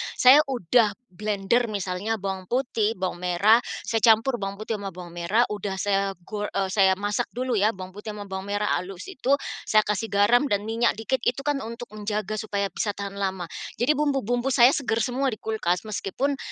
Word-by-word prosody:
Saya 260 +3 +8
udah 230 -3 +2 0.2
blender 210 +4 0
misalnya 200 +1 -2
bawang 190 -2 -5
putih, 230 -3 0
bawang 185 -2 -3
merah, 180 +6 +4 0.2
saya 225 - 0
campur 230 +3 +4
bawang 195 0 -3
putih 215 +1 -4
sama 200 - -5
bawang 180 -2 -8
merah 175 +7 +1
udah 205 -1 -3
saya 195 -1 +1 0.2
go 210 -1 -3
eee, 195 -2 -2
saya 190 -1 +4
masak 205 +2 -1
dulu 250 -1 -1
ya 210 +3 +3
bawang 185 -1 -8
putih 210 +3 -8
sama 205 -1 -8
bawang 190 0 -5
merah 205 0 0
halus 180 - -7
itu, 280 -8 0 0.3
saya 215 - +5
kasih 210 +1 -2
garam 210 +7 +4
dan 205 -7 0
minyak 225 +2 +1
dikit 225 +5 -1
itu 250 +3 +1
kan 290 0 0
untuk 235 +1 -7
menjaga 215 0 -3
supaya 200 -2 -2
bisa 205 +3 -2
tahan 200 0 -6
lama. 190 -3 -2 0.3
Jadi 285 +4 +3
bumbu-bumbu 270 -3 0
saya 240 +2 +7
segar 230 -5 0
semua 255 +3 0
di 215 - -9
kulkas, 180 -6 -1
meskipun 220 +6 -2
210 Hz, 190 wpm, -25 LUFS, 195-235 Hz, 0.3 s, Saya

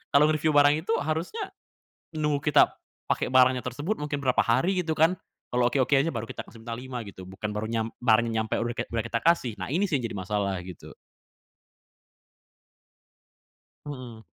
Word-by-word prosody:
kalau 145 +1 +7
ngereviu 155 0 +1
barang 145 0 +6
itu, 185 +8 -2
harusnya 165 - -3 0.7
nunggu 150 -1 0
kita - - +7 0.4
pakai - - 0
barangnya 130 -1 +5
tersebut, 145 - -2
mungkin 150 -1 -3
berapa 130 -3 +1
hari, 175 +11 +2
gitu 160 - -2
kan. 160 +4 +4 0.4
Kalau 125 0 +2
oke-oke 135 +2 +2
aja, 140 +5 +2
baru 115 -4 -4
kita - - -6
kasih 115 - -15
bintang 115 0 -4
5, 130 -1 -6
gitu. 95 -2 -10
Bukan 95 +3 -5
baru 110 +1 -2
nyam 115 -1 0 0.2
barangnya 115 -1 +3
nyampe 110 - -2
udah 120 0 -2
kayak - - -4
udah 115 -1 -1
kita 115 0 -1
kasih. 130 -10 +2
Nah, 95 +7 -4
ini 190 +7 +1
sih, 170 - 0
yang 120 - -4
jadi - - -5
masalah, 100 0 -1
gitu. 90 - -10 2.9
Mhm. 125 -6 -8
130 Hz, 175 wpm, -27 LUFS, 115-150 Hz, 2.9 s, kalau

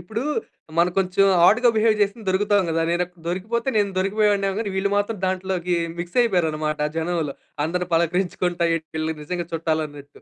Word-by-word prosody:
ఇప్పుడూ 225 +2 -4 0.6
మనం 175 +1 +4
కొంచెం 190 +1 +2 0.2
ఆడ్‌గా 240 +5 +5
బిహేవ్ 220 0 +4
చేస్తే 205 +2 0
దొరుకుతాం 200 +1 +2
గదా! 165 0 +1
నేను 175 +1 +1
అక్ 180 0 -20
దొరికిపోతే 220 +8 -2
నేను 205 -1 +2
దొరికిపోయేవాడిని 200 0 +2
గాని 215 -3 -2
వీళ్ళు 200 +1 +1
మాత్రం 205 0 -1
దాంట్లోకి 185 -2 -1 0.2
మిక్స్ 175 +4 -6
అయిపోయారన్నమాట 155 -8 0 0.2
జనంలో. 165 -3 -1 0.3
అందరిని 180 +2 -2
పలకరించుకుంటా 175 +1 0
ఎ - - -3 0.2
వీళ్లు 160 0 -1
నిజంగా 175 +2 -4
చుట్టాలు 160 -1 0
అన్నట్టు. 145 -1 -12
180 Hz, 160 wpm, -23 LUFS, 165-205 Hz, 0.6 s, ఆడ్‌గా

